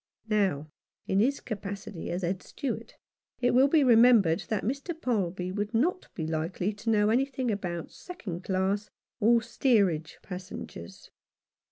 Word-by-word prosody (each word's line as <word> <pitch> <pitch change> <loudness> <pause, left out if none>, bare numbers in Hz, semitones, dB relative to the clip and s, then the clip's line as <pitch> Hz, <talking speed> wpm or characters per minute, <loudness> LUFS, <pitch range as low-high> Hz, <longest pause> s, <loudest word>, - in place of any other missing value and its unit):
Now, 185 -8 +1 0.3
in 190 - +1
his 270 +6 +2
capacity 200 -4 -6
as 180 +2 -3
Head 180 +2 -1
Steward 280 -3 -5 0.4
it 245 -1 +2
will 260 +3 +6
be 300 0 +4
remembered 230 -8 +5
that 215 -3 -1
Mr. 280 - -3
Palby 185 - -1
would 205 +3 -3
not 345 +10 +1
be 160 - -3
likely 165 +5 -2
to 210 +3 -5
know 210 -1 +3
anything 260 0 +1
about 175 -5 -4
second 190 - -7
class 195 +2 0 0.3
or 230 +2 +4
steerage 200 - +1
passengers. 185 0 -8
205 Hz, 140 wpm, -28 LUFS, 185-245 Hz, 0.4 s, will